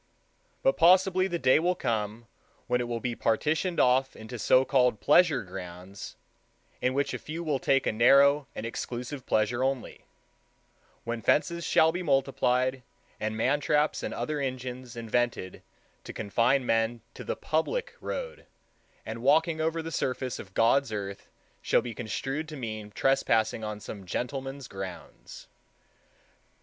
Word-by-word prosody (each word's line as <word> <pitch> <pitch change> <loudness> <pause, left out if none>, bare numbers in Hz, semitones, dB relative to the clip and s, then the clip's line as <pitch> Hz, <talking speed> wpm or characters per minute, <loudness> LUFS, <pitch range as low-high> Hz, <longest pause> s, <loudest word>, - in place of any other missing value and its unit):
But - - +3
possibly 185 +1 +5
the 175 -2 -2
day 130 -2 +4
will 180 +3 +1
come 110 - -2 0.4
when 125 - +1
it 120 - -3
will 120 -1 -2
be 120 0 -2
partitioned 155 +11 0
off 130 +1 +3
into 110 +2 -8
so 130 +4 +4
called 125 -5 +2
pleasure 155 -4 +4
grounds, 90 +1 -9 0.7
in 130 +1 +1
which 140 +1 0
a - - -3
few 160 +3 -6
will 150 -4 0
take 135 +1 +2
a - - +2
narrow 140 +5 +5
and 110 - -5
exclusive 125 +3 -5
pleasure 115 +4 +1
only,—when 120 -2 -7
fences 170 +7 +1
shall 160 0 +4
be 175 +2 -3
multiplied, 130 -3 +1 0.4
and 110 0 -2
man 130 +6 +2
traps 150 +1 +1
and - - -4
other 150 -1 -3
engines 130 -2 -5
invented 115 -4 -2 0.4
to - - -8
confine 120 +5 +1
men 115 0 +1
to - - -9
the - - -3
public 465 - -1
road, 485 -1 -5 0.6
and 115 +1 -6
walking 160 +4 +3
over 165 +1 -1
the 165 - -6
surface 130 -3 -2
of 95 -1 -11
God's 120 +3 +3
earth 100 -2 -5 0.3
shall - - +2
be 120 -2 -5
construed 135 +8 -4
to 155 - -7
mean 110 -4 -5
trespassing 115 -2 +1
on 105 -1 -4
some 100 -2 -9
gentleman's 135 +5 -4
grounds. 95 -3 -9
130 Hz, 145 wpm, -28 LUFS, 115-150 Hz, 0.7 s, possibly